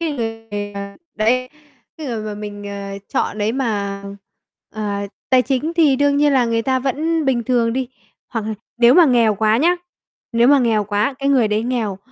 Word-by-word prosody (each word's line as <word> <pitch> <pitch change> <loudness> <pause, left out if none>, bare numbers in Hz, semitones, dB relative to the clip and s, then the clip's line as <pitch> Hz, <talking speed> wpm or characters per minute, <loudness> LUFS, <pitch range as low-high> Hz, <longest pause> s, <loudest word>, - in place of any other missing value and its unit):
cái 325 -3 -1
người, 225 -4 -5
à, 200 0 -7 0.2
đấy, 250 +4 +1 0.5
cái 305 - -6
người 230 -4 -3
mà 210 -1 -4
mình, 205 -1 -7
ờ, 200 0 -6
chọn 210 - -1
đấy 210 +2 0
mà, 205 -6 -2 0.7
ờ, 215 -1 -3 0.4
tài 255 -1 +5
chính 275 +6 -1
thì 305 -6 +4
đương 285 0 +2
nhiên 290 0 +3
là 260 -3 +4
người 230 -1 0
ta 260 +1 +1
vẫn 310 +5 -1
bình 250 -4 +1
thường 235 -2 +1
đi, 255 -1 -2 0.4
hoặc 225 -3 -3
là 220 - -2 0.2
nếu 240 +1 +6
mà 350 - +8
nghèo 235 -5 +3
quá 215 +2 +2
nhá, 340 +8 +3 0.6
nếu 235 +1 +4
mà 285 0 +6
nghèo 225 -5 +2
quá, 210 +6 0
cái 275 - -1
người 255 -6 +3
đấy 210 +1 0
nghèo, 230 -6 -2
235 Hz, 200 wpm, -19 LUFS, 215-270 Hz, 0.7 s, mà